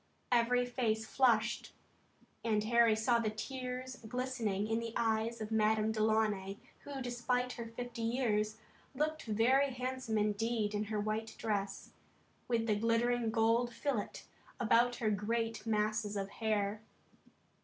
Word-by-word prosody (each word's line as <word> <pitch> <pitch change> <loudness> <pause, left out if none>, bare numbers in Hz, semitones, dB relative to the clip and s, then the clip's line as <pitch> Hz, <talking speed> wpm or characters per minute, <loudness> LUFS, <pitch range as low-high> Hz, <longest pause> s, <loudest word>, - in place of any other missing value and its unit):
Every 245 +1 +3
face 225 -3 0
flushed, 235 -2 +2 0.7
and 215 -2 +1
Harry 230 0 +4
saw 235 +2 +2
the 225 -2 0
tears 255 +3 -5
glistening 235 -5 -1
in 225 +1 +1
the 230 -1 -5
eyes 225 0 0
of 215 0 -5
Madame 220 0 +3
Delaunay 215 -3 +1 0.3
who, 275 -2 -5
despite 245 +1 -1
her 235 -2 -6
fifty 235 +1 -6
years, 220 -3 0 0.4
looked 310 +3 -1
very 245 +6 +3
handsome 255 -2 -2
indeed 210 +1 0
in 210 +1 -1
her 210 0 -2
white 215 +2 -2
dress, 200 -3 -2 0.6
with 230 -2 +1
the 215 -2 +2
glittering 230 +2 +1
gold 230 +2 +2
fillet 245 -6 -3 0.4
about 240 +1 +4
her 220 -3 0
great 225 +3 -1
masses 215 -1 0
of 195 0 -3
hair. 210 -2 -1
225 Hz, 135 wpm, -34 LUFS, 215-245 Hz, 0.7 s, Harry